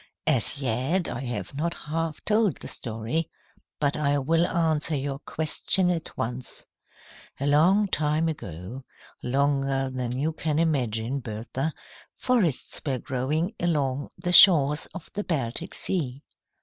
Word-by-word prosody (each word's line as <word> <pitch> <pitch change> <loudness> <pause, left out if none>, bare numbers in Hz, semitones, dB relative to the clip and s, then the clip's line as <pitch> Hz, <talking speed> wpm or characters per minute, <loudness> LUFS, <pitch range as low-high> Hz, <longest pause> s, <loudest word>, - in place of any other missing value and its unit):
"As 135 -3 +2
yet, 135 +7 0
I 120 - -4
have 120 -6 -4
not 170 +5 -2
half 160 0 -4
told 215 -3 +2
the - - -9
story. 115 +7 -3 0.5
But 145 -2 +1
I 145 -1 +1
will 165 +5 +2
answer 160 -2 +1
your 140 0 -2
question 170 +4 +1
at 165 -2 -4
once. 125 +2 -5 0.7
"A 140 - -1
long 175 +9 +4
time 155 -1 +1
ago, 110 - -6 0.4
longer 135 0 0
than 125 -1 -2
you 155 +4 0
can 155 -1 -1
imagine, 130 -6 0
Bertha, 120 +6 -4 0.5
forests 215 - +1
were 135 -4 0
growing 150 - -1
along 145 -5 0
the 180 - -2
shores 150 -6 +7
of 190 -4 -10
the 205 - -2
Baltic 155 - -3
Sea. 140 -7 -1
145 Hz, 135 wpm, -26 LUFS, 130-165 Hz, 0.7 s, shores